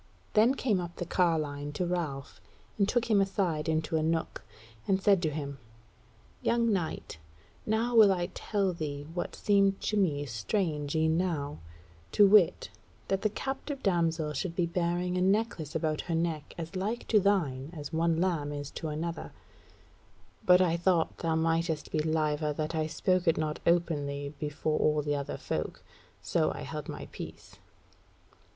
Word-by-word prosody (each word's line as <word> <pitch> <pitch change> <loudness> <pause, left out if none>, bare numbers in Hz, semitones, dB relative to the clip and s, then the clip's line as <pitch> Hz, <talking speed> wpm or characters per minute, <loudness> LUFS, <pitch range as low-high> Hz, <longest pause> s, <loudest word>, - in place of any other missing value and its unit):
Then 230 +5 +5
came 220 -9 +1
up 175 -1 -7
the 175 - -4
carline 155 -5 0
to 180 - -1
Ralph 155 -6 -3 0.4
and 200 - +3
took 240 -1 +1
him 210 -3 +3
aside 180 -6 0
into 160 0 0
a - - +1
nook, 160 +1 -1 0.4
and 190 -1 +3
said 195 -2 +4
to 160 - +1
him: 140 -2 -5 0.8
"Young 235 -2 +2
knight, 165 - -3 0.5
now 225 +3 +1
will 215 -3 +8
I 175 -1 -1
tell 200 -3 -1
thee 145 -3 -5
what 175 - -3
seemed 195 -1 +3
to 215 - -1
me 150 -8 +1
strange 150 - -2
e'en 160 +1 +2
now; 150 -6 -2 0.5
to 205 - +7
wit, 195 -3 +4 0.4
that 195 0 +1
the 215 - +2
captive 270 +5 -5
damsel 165 -5 +1
should 170 +4 -3
be 175 - +2
bearing 175 +1 -1
a - - +1
necklace 190 -5 0
about 155 -2 0
her 165 - +1
neck 165 -3 -2
as 165 +2 -6
like 210 +6 -2
to 215 - +5
thine 160 -10 +1
as 155 -2 -8
one 165 0 +2
lamb 165 -5 0
is 145 -1 -5
to 160 - -5
another: 165 +2 -4 1.1
but 180 -2 +6
I 170 -2 +2
thought 170 -1 +1
thou 165 -1 0
mightest 165 -1 0
be 155 - 0
liever 155 -1 0
that 155 +2 -3
I 155 -1 0
spake 185 +3 0
it 165 - +4
not 155 -1 -2
openly 145 -4 0
before 150 +1 -1
all 150 -1 +2
the 145 0 0
other 140 -1 -4
folk. - - -4 0.4
So - - +1
I - - -6
held - - -6
my - - -6
peace." - - -9
165 Hz, 165 wpm, -30 LUFS, 150-190 Hz, 1.1 s, will